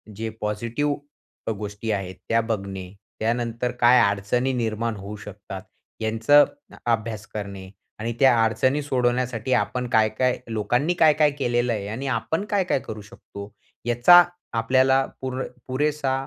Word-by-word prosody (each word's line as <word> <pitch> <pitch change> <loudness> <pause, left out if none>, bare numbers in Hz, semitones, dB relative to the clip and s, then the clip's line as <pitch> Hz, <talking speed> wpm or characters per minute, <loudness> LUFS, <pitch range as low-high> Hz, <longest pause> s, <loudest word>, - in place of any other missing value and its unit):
जे 110 +2 -4
पॉझिटिव्ह 115 +7 -1 0.5
अ - - +1
गोष्टी 105 +1 -4
आहेत, 95 -2 -3
त्या 115 0 +3
बघणे. 100 -4 -4 0.3
त्यानंतर 120 +1 -1
काय 120 +1 +7
अडचणी 105 +6 0
निर्माण 115 -1 -1
होऊ 100 +2 -7
शकतात 100 -2 -8 0.4
यांच 110 +2 -3
अ 145 0 +10 0.5
अभ्यास 110 -1 -2
करणे. 100 -2 -6 0.3
आणि 115 +2 -2
त्या 130 -3 +6
अडचणी 130 +6 +1
सोडवण्यासाठी 125 -2 0
आपण 125 +4 0
काय-काय 110 +3 +2
लोकांनी 120 +9 0
काय-काय 150 -1 +5
केलेलं 120 -2 +1
आहे 100 -2 -4
आणि 120 +6 -4
आपण 160 +7 -1
काय-काय 190 -7 +1
करू 110 -1 -7
शकतो, 100 0 -11 0.3
याचा 120 +10 +7 0.3
आपल्याला 130 +3 +3 0.2
पुर 130 0 -3 0.3
पुरेसा 140 +1 0
115 Hz, 135 wpm, -24 LUFS, 105-130 Hz, 0.5 s, अ